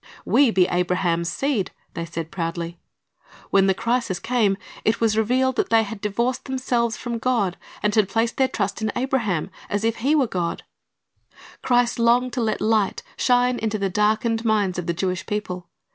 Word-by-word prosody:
"We 280 -3 +4
be 190 -5 +4
Abraham's 175 -1 0
seed,"^ 270 -6 -1 0.2
they 170 - -4
said 165 -1 -6
proudly. 170 -2 -4 0.7
When 195 0 +5
the 190 - +3
crisis 230 -3 0
came, 220 -5 +1 0.3
it 215 - +1
was 225 -2 +2
revealed 255 +4 +1
that - - +1
they 225 -1 +5
had 210 -1 -7
divorced 235 +5 -1
themselves 245 -3 0
from 235 -2 -4
God, 225 -7 +1 0.3
and 210 0 +2
had 210 -3 +3
placed 230 +2 0
their 265 - +4
trust 205 -3 -2
in 220 - 0
Abraham, 240 -10 -1 0.2
as 205 +1 -1
if 225 0 +1
he 275 +6 +2
were 285 -4 +4
God. 175 -6 -3 1.0
Christ 245 -1 +2
longed 240 +2 +3
to 250 - -1
let 220 -2 -1
light 215 -3 +1
shine 245 0 +2
into 220 -1 -1
the 195 -2 -1
darkened 220 +3 +1
minds 205 -5 +1
of 175 - -5
the 170 - +1
Jewish 185 +1 -2
people. 185 -4 -4
220 Hz, 175 wpm, -23 LUFS, 190-240 Hz, 1.0 s, When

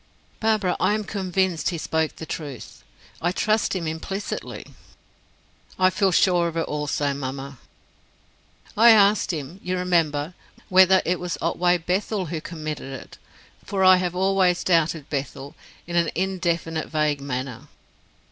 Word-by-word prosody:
"Barbara, 215 -5 +1
I 195 +4 +2
am 215 - -2
convinced 190 -4 -1
he 175 - -3
spoke 160 0 -1
the 160 - -8
truth; 145 -6 -7 0.4
I 175 - +1
trust 215 +2 +1
him 175 -3 -2
implicitly." 160 +6 -5 1.1
"I 185 0 +4
feel 190 0 +2
sure 175 -1 +3
of 165 0 -5
it 165 - +1
also, 150 -1 -1
mamma." 135 -1 -6 1.2
"I 230 +3 +7
asked 210 -2 +5
him, 160 +3 -6
you 185 0 -2
remember, 165 -3 0 0.4
whether 190 0 +6
it 180 +1 0
was 180 -1 -3
Otway 175 +1 +2
Bethel 185 +3 -1
who 160 -1 -4
committed 155 -4 -6
it; - - -14 0.4
for 195 -1 -1
I 185 0 +8
have 180 -1 -2
always 190 -1 +2
doubted 165 -4 +1
Bethel, 140 0 -4 0.3
in 175 - -6
an 170 -2 +3
indefinite, 170 -3 -1
vague 150 -2 0
manner. 130 0 -5
175 Hz, 140 wpm, -24 LUFS, 155-185 Hz, 1.2 s, I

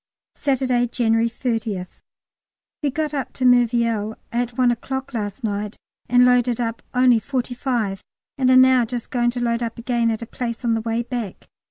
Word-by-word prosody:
Saturday, 255 -3 +1
January 230 -1 +1
30th. 225 -6 -3 0.8
We 290 - +1
got 305 +2 -2
up 275 -3 -3
to 255 - -2
Merville 235 -3 +2
at 240 0 -2
one 250 -1 +4
o'clock 265 +3 -4
last 210 +1 -4
night, 205 -1 -3 0.3
and 245 0 +6
loaded 245 -1 +3
up 230 -1 -2
only 250 -2 +5
forty 250 +2 -3
five, 235 -7 -2 0.3
and 260 -2 +2
are 255 - +6
now 255 -1 +6
just 235 0 -5
going 240 -1 +2
to 245 +1 -3
load 235 0 0
up 230 -1 -3
again 235 -1 0
at 225 0 -2
a - - -5
place 235 +1 -5
on 230 - +2
the 225 - 0
way 230 +1 -1
back. 235 -5 -6
240 Hz, 180 wpm, -22 LUFS, 225-250 Hz, 0.8 s, and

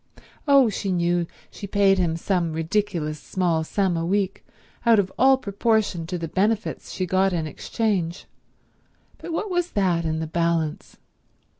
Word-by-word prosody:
Oh, 275 -3 +6
she 200 -2 -2
knew 175 -1 +1 0.2
she 200 - -8
paid 195 -1 +3
him 165 -2 0
some 170 -2 -1
ridiculous 165 -3 -1
small 170 -4 0
sum 190 +2 0
a 165 - -1
week, 195 +2 -1 0.4
out 230 -2 +5
of 190 -2 0
all 265 +1 +5
proportion 200 -6 0
to 180 +1 -3
the 165 -1 -4
benefits 210 +6 -1
she 185 - -2
got 190 +1 +2
in 165 -2 -1
exchange, 180 0 -2 0.9
but - - -7
what 390 +5 -2
was 355 -1 -1
that 180 -4 +1
in 160 -1 -1
the 160 - -2
balance? 165 -1 -1
185 Hz, 155 wpm, -24 LUFS, 165-205 Hz, 0.9 s, Oh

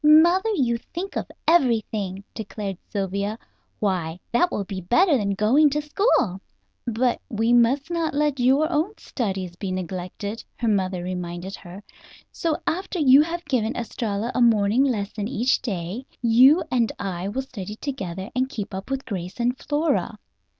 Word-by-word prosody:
Mother, 340 +7 +6
you 235 -7 +1 0.2
think 380 +3 -4
of - - -3 0.2
everything," 220 - +2
declared 205 -3 -5
Sylvia. 200 +1 -2 0.4
"Why, 180 -5 -1
that 345 +10 +3
will 205 - -1
be 190 -1 -6
better 300 - +4
than 200 -5 0
going 255 +10 +4
to 295 +2 0
school!" 295 - +1 0.5
"But 240 +1 +1
we 225 +2 +1
must 250 +6 +3
not 335 -3 -1
let 295 -2 +1
your 265 +5 +4
own 340 +7 0
studies 190 -7 -3
be 195 -1 -4
neglected," 185 +4 -5
her 235 - -1
mother 190 -4 0
reminded 180 +1 -5
her, 190 +2 -11 0.5
"so 325 -2 -1
after 375 +2 -2
you 280 -3 +7
have 340 +2 -3
given 245 -5 0
Estralla 225 -1 -3
a - - 0
morning 225 +1 +4
lesson 210 -5 -1
each 250 +1 +1
day 200 +4 -4
you 250 +8 +6
and 235 -3 +2
I 185 -1 -3
will 260 +7 -2
study 210 -6 -7
together 195 -8 -5
and 255 +1 +1
keep 210 -8 -5
up 190 +4 -6
with 270 0 -2
Grace 185 -2 -5
and 245 +1 +1
Flora. 295 +4 -1
230 Hz, 155 wpm, -24 LUFS, 195-275 Hz, 0.5 s, you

